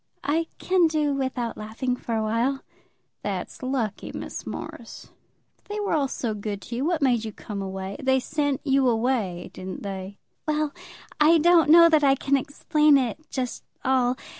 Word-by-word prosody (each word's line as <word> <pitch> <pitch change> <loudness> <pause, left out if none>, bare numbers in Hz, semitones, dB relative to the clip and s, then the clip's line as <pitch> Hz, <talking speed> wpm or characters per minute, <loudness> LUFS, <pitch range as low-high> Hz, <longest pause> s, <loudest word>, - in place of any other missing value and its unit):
"I 325 +3 0
can 365 -2 +3
do 305 -2 +1
without 260 -4 -2
laughing 225 +4 -2
for 235 -2 -4
a 220 - 0
while." 235 +5 0 0.6
"That's 195 -3 -4
lucky, 255 -6 -2
Miss - - -7
Morris. - - -8 0.5
If - - -38
they 420 +1 -4
were 410 -3 -1
all 290 -3 +2
so 235 -4 -3
good 205 -1 -4
to 235 - -6
you, 250 - -1
what 330 -3 0
made 245 -4 +3
you 220 - -4
come 205 -1 -6
away? 190 0 -5
They 265 -1 +3
sent 285 0 -1
you 270 -2 +3
away, 225 -7 -1
didn't 185 0 -7
they?" 195 0 -6 0.3
"Well; 305 -1 0 0.5
I 315 +3 +6
don't 330 0 +5
know 335 +1 +9
that 310 -3 +4
I 275 -1 +5
can 280 +1 +1
explain 300 +1 +3
it 250 -1 -1
just 250 -3 -3 0.2
all. 255 -1 +2
260 Hz, 175 wpm, -25 LUFS, 220-300 Hz, 0.6 s, know